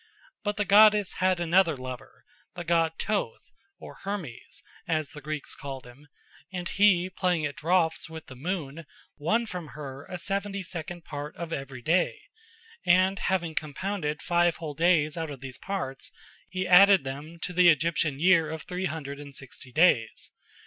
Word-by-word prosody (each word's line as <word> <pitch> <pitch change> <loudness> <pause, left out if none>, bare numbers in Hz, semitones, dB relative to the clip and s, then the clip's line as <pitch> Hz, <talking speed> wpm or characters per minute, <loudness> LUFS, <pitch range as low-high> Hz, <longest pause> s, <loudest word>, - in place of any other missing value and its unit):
But 205 -1 -2
the 210 - +1
goddess 210 0 +6
had 185 -1 +2
another 170 -2 +3
lover, 130 -1 -9 0.3
the 175 - -5
god 165 -1 +2
Thoth 210 -2 -2 0.3
or - - -12
Hermes, 190 - -6 0.2
as 155 -3 0
the 150 -1 -11
Greeks 150 0 -4
called 135 -2 -7
him, 130 +4 -15 0.4
and 180 -2 -4
he 195 -3 +4
playing 180 -4 0
at 145 - -4
draughts 165 0 +1
with 160 -1 -9
the 130 - -11
moon 160 0 -4 0.3
won 220 +11 +1
from 180 -7 -6
her 140 -2 -7
a 180 - -6
seventy 200 +2 -3
second 175 0 -6
part 145 0 -6
of 170 -1 -5
every 135 -3 -6
day, 175 - +2 0.6
and 185 +3 +4
having 175 -4 0
compounded 155 0 -3
five 175 -1 +2
whole 155 -3 -6
days 160 -1 +2
out 160 -1 -3
of 140 -3 -8
these 135 0 -7
parts 180 -9 -4 0.4
he 185 0 -2
added 195 -1 +7
them 145 +5 -7
to 180 - -3
the 180 0 +6
Egyptian 155 -2 +1
year 170 -2 +4
of 160 0 -5
three 180 +1 -4
hundred 145 -5 -5
and 140 -1 -10
sixty 130 -1 -9
days. 130 -7 +2
165 Hz, 165 wpm, -27 LUFS, 145-185 Hz, 0.6 s, added